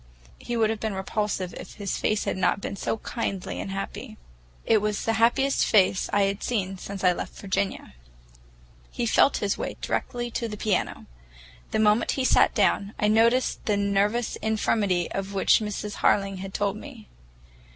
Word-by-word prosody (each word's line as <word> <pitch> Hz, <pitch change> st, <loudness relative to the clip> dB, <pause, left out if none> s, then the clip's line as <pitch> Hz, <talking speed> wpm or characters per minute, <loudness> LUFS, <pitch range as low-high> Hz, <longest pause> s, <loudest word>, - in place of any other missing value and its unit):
He 240 Hz, -, -4 dB
would 220 Hz, -1 st, +3 dB
have 220 Hz, -, -4 dB
been 215 Hz, -2 st, -3 dB
repulsive 190 Hz, -1 st, -2 dB
if -, -, -9 dB
his 200 Hz, -2 st, -3 dB
face 215 Hz, -1 st, +1 dB
had -, -, -1 dB
not 190 Hz, +1 st, +1 dB
been 200 Hz, -, -5 dB
so 220 Hz, -, -2 dB
kindly 200 Hz, -4 st, -4 dB
and -, -, -5 dB
happy. 195 Hz, 0 st, -6 dB, 0.5 s
It 220 Hz, -, +4 dB
was 210 Hz, -1 st, -1 dB
the 225 Hz, -, +2 dB
happiest 270 Hz, +4 st, +3 dB
face 190 Hz, -3 st, +3 dB
I 205 Hz, -, +3 dB
had 195 Hz, 0 st, -1 dB
seen 195 Hz, -5 st, -2 dB
since 195 Hz, 0 st, -7 dB
I 180 Hz, -1 st, +5 dB
left -, -, -6 dB
Virginia. 195 Hz, -, -2 dB, 1.0 s
He 240 Hz, -, -3 dB
felt 255 Hz, +4 st, +4 dB
his 200 Hz, -, -1 dB
way -, -, -4 dB
directly 240 Hz, -1 st, -3 dB
to 230 Hz, -, -2 dB
the 210 Hz, -1 st, -6 dB
piano. 205 Hz, -2 st, -1 dB, 0.6 s
The -, -, -1 dB
moment 215 Hz, +1 st, +3 dB
he 265 Hz, -, -1 dB
sat -, -, +4 dB
down, 200 Hz, -1 st, +1 dB
I 210 Hz, -, +2 dB
noticed 230 Hz, +3 st, +3 dB
the 210 Hz, -2 st, +2 dB
nervous 200 Hz, +3 st, +1 dB
infirmity 205 Hz, -5 st, 0 dB
of 195 Hz, +1 st, -4 dB
which 195 Hz, -, +4 dB
Mrs. 210 Hz, -1 st, -4 dB
Harling 195 Hz, -1 st, +2 dB
had 195 Hz, +1 st, -6 dB
told 205 Hz, 0 st, 0 dB
me. 235 Hz, -3 st, -11 dB
210 Hz, 175 wpm, -26 LUFS, 195-225 Hz, 1.0 s, I